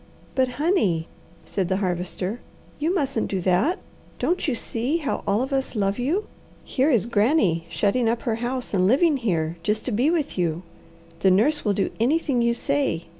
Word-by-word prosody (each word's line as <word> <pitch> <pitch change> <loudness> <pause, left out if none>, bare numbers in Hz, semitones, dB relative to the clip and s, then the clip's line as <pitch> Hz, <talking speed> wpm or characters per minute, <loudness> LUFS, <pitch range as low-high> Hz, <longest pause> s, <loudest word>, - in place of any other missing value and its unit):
"But, 260 -2 +1
honey," 215 - +1 0.4
said 190 -3 -2
the 190 - +1
Harvester, 185 +3 -2 0.4
"you 315 +3 +1
mustn't 275 - 0
do 195 - -1
that! 185 - +2 0.4
Don't 355 -1 0
you 270 - +1
see 240 +7 -1
how 295 -4 -3
all 205 +4 +2
of 270 +1 -4
us 270 -2 -1
love 200 +1 0
you? 330 +12 0 0.4
Here 270 +3 +1
is 235 - +3
Granny 205 - +2
shutting 225 +3 +1
up 230 0 -1
her 225 -2 -1
house 245 +1 -3
and 185 -1 +3
living 290 - +4
here, 170 -9 -1
just 210 +4 -1
to 255 - -1
be 245 +7 +2
with 310 - -1
you. 170 0 -1 0.6
The 190 - +4
nurse 225 +12 +3
will 205 - +2
do 195 - 0
anything 270 +1 +2
you 235 0 +2
say. 275 - -1
235 Hz, 180 wpm, -24 LUFS, 195-280 Hz, 0.6 s, living